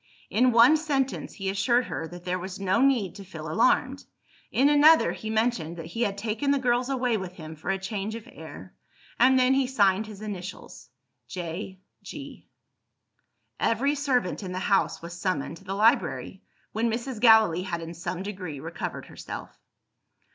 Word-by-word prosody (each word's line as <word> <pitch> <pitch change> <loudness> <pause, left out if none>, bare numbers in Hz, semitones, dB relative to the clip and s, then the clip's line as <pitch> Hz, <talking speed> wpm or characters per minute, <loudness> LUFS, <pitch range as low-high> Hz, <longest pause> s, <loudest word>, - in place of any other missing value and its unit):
In 250 +3 +4
one 235 +7 +7
sentence, 275 -4 -2
he 195 - -5
assured 220 +6 +2
her 160 - -4
that 175 +1 -11
there 180 0 -1
was 185 +1 -7
no 195 +4 +1
need 255 -9 +2
to 200 - -10
feel 190 - -8
alarmed. - - +2 0.5
In 270 - +4
another, 295 +2 +6
he 220 - -6
mentioned 220 -7 0
that 165 - -7
he 170 +8 -5
had 200 -4 0
taken 220 +6 -2
the 280 - +4
girls 250 -1 +1
away 250 -4 +1
with 185 -2 -6
him 160 -2 -9
for 160 - -7
a 195 - +1
change 200 +2 -4
of 230 +1 -9
air. - - -11 0.5
And 260 +1 +6
then 255 +1 +4
he 270 -1 +2
signed 210 -4 +2
his 210 -1 -10
initials 195 -3 -8 0.4
J. 185 +1 -6 0.2
G. - - -10 1.1
Every 265 +6 +1
servant 265 -11 0
in 185 -2 -6
the - - -4
house 195 -2 +1
was 170 +1 -7
summoned 175 -4 -2
to - - -17
the 195 0 -3
library, 225 +6 +1 0.3
when 230 +2 0
Mrs. 235 +1 -4
Gallilee 220 -7 +6
had 180 -2 -3
in 165 +1 -7
some 175 +2 -5
degree 185 -8 -6
recovered - - -5
herself. - - -9
210 Hz, 175 wpm, -26 LUFS, 185-250 Hz, 1.1 s, one